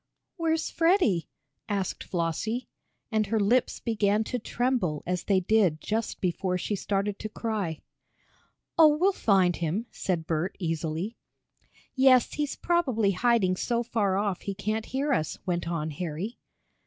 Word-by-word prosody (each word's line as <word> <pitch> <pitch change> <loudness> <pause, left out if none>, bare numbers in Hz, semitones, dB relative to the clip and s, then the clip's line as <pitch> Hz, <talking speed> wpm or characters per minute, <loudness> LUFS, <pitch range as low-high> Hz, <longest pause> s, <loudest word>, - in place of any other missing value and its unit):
"Where's 325 -3 0
Freddie?" 330 - +2 0.4
asked 200 -3 -2
Flossie, 180 +8 -2 0.4
and 215 -2 +1
her 225 0 +1
lips 235 +5 +2
began 210 -2 +1
to 250 +3 -3
tremble 235 - -1
as 180 0 -2
they 195 -2 +3
did 185 -5 +3
just 220 +5 -2
before 180 0 0
she 205 +3 -2
started 200 +1 -1
to 215 - -5
cry. 210 -8 -3 1.0
"Oh, 305 -2 +7
we'll 380 +5 +3
find 190 - +3
him," 175 +7 -1
said 175 -4 -2
Bert, 165 +3 -1
easily. 165 +4 -3 0.8
"Yes, 260 -2 +5
he's 295 -2 -2
probably 260 - +1
hiding 200 -2 +2
so 235 +5 0
far 205 -5 0
off 200 -2 -1
he 200 - -4
can't 215 +2 -2
hear 280 +2 0
us," 155 -10 -1
went 175 -2 -1
on 160 -2 -2
Harry. 175 +8 -5
205 Hz, 140 wpm, -27 LUFS, 180-240 Hz, 1.0 s, Oh